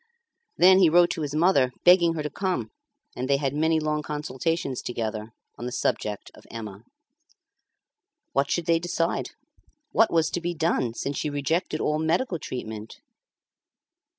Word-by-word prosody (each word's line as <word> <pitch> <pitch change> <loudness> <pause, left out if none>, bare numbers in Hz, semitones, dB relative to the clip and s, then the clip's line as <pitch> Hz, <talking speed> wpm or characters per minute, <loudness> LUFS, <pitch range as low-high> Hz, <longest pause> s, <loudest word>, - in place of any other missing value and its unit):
Then 185 +1 +7
he 180 -4 +6
wrote 175 +2 +5
to 165 - -4
his 145 -1 -3
mother 155 -6 +3
begging 175 -2 +6
her 155 - -3
to 150 - -3
come, 185 +2 -2 0.4
and 130 +2 -4
they 140 - +4
had 135 -1 -1
many 160 +2 +2
long 150 0 -1
consultations 150 -1 -3
together 110 -2 -4 0.3
on 120 - -4
the - - -4
subject 105 -4 -2
of - - -17
Emma. 105 -3 -8 1.5
What 140 0 +1
should 175 - -1
they 165 0 +3
decide? 170 0 -1 0.6
What 225 - +4
was 165 -2 +2
to 175 - -2
be 175 0 -3
done 155 -8 0
since 140 +2 -3
she 150 - -1
rejected 155 +3 -1
all 150 0 0
medical 170 +4 0
treatment? 110 -5 -7
150 Hz, 155 wpm, -25 LUFS, 130-170 Hz, 1.5 s, Then